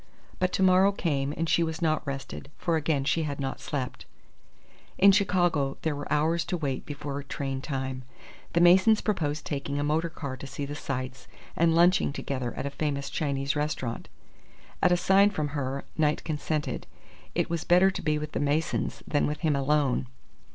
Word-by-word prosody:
But 185 Hz, 0 st, +1 dB
to 190 Hz, -, +2 dB
morrow 190 Hz, +1 st, +5 dB
came 145 Hz, -8 st, -1 dB
and 165 Hz, -, -1 dB
she 170 Hz, -, +3 dB
was 160 Hz, -1 st, -1 dB
not 155 Hz, -2 st, +1 dB
rested; 140 Hz, 0 st, -6 dB
for 170 Hz, -, 0 dB
again 150 Hz, -3 st, +1 dB
she 160 Hz, +4 st, +1 dB
had 145 Hz, -2 st, -3 dB
not 135 Hz, -1 st, -3 dB
slept. 130 Hz, -3 st, -4 dB, 0.9 s
In 200 Hz, +1 st, +7 dB
Chicago 175 Hz, -8 st, +2 dB
there 160 Hz, -2 st, 0 dB
were 145 Hz, -, -7 dB
hours 160 Hz, +3 st, +2 dB
to 175 Hz, +1 st, -2 dB
wait 140 Hz, -5 st, -3 dB
before 145 Hz, -1 st, -5 dB
train 135 Hz, -1 st, -4 dB
time. 130 Hz, -2 st, -3 dB, 0.5 s
The 170 Hz, -, +3 dB
Masons 190 Hz, +5 st, +6 dB
proposed 155 Hz, -8 st, -1 dB
taking 140 Hz, -1 st, -3 dB
a 145 Hz, -, 0 dB
motor 155 Hz, +3 st, +1 dB
car 140 Hz, -5 st, -6 dB
to 140 Hz, -, -8 dB
see 140 Hz, +1 st, -5 dB
the 145 Hz, -, -6 dB
sights, 130 Hz, -3 st, -5 dB, 0.3 s
and 165 Hz, 0 st, +3 dB
lunching 175 Hz, -1 st, +4 dB
together 130 Hz, -4 st, -3 dB
at -, -, -4 dB
a 140 Hz, -, -3 dB
famous 140 Hz, -1 st, -2 dB
Chinese 140 Hz, -2 st, -1 dB
restaurant. 145 Hz, -5 st, -3 dB, 0.7 s
At 180 Hz, -, +4 dB
a 175 Hz, -, +4 dB
sign 195 Hz, +3 st, +5 dB
from 155 Hz, -7 st, -2 dB
her, 140 Hz, -2 st, -3 dB
Knight 150 Hz, -1 st, +2 dB
consented. 155 Hz, -1 st, -3 dB, 0.5 s
It -, -, 0 dB
was 165 Hz, -2 st, -1 dB
better 180 Hz, +2 st, +5 dB
to -, -, -5 dB
be 155 Hz, -1 st, +1 dB
with 150 Hz, 0 st, -5 dB
the -, -, -2 dB
Masons 145 Hz, +2 st, -1 dB
than 145 Hz, -, +1 dB
with 150 Hz, 0 st, -4 dB
him 155 Hz, -4 st, +2 dB
alone. 140 Hz, -2 st, +1 dB
150 Hz, 185 wpm, -28 LUFS, 140-170 Hz, 0.9 s, In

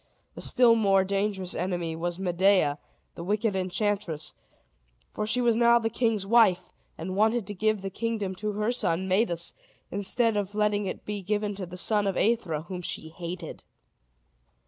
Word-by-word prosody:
A -, -, -8 dB
still 245 Hz, -2 st, +4 dB
more 195 Hz, -4 st, +4 dB
dangerous 195 Hz, -1 st, -1 dB
enemy 175 Hz, -2 st, -2 dB
was 175 Hz, +1 st, -3 dB
Medea, 180 Hz, -5 st, +2 dB, 0.3 s
the 170 Hz, -, -7 dB
wicked 210 Hz, +2 st, 0 dB
enchantress; 190 Hz, -3 st, -2 dB, 0.8 s
for 210 Hz, -, -2 dB
she 250 Hz, +3 st, 0 dB
was 235 Hz, -2 st, +3 dB
now 235 Hz, +1 st, +5 dB
the 225 Hz, -1 st, -1 dB
king's 225 Hz, -4 st, 0 dB
wife, 215 Hz, -4 st, +4 dB, 0.3 s
and 185 Hz, +3 st, -4 dB
wanted 220 Hz, +2 st, +2 dB
to 205 Hz, -, -4 dB
give 215 Hz, 0 st, 0 dB
the 195 Hz, -, -4 dB
kingdom 215 Hz, -2 st, -2 dB
to 210 Hz, +1 st, -2 dB
her 210 Hz, +3 st, 0 dB
son 190 Hz, -6 st, -1 dB
Medus, 185 Hz, -3 st, 0 dB, 0.4 s
instead 210 Hz, +4 st, +1 dB
of 205 Hz, 0 st, -3 dB
letting 210 Hz, -1 st, +1 dB
it -, -, -6 dB
be 210 Hz, -1 st, -4 dB
given 205 Hz, +2 st, -1 dB
to 190 Hz, -2 st, -6 dB
the 180 Hz, +1 st, -9 dB
son 205 Hz, +1 st, +1 dB
of 195 Hz, -, -1 dB
Aethra, 190 Hz, -9 st, +1 dB
whom 180 Hz, +1 st, -6 dB
she 160 Hz, -2 st, -5 dB
hated. 170 Hz, 0 st, -7 dB
200 Hz, 170 wpm, -27 LUFS, 180-215 Hz, 0.8 s, now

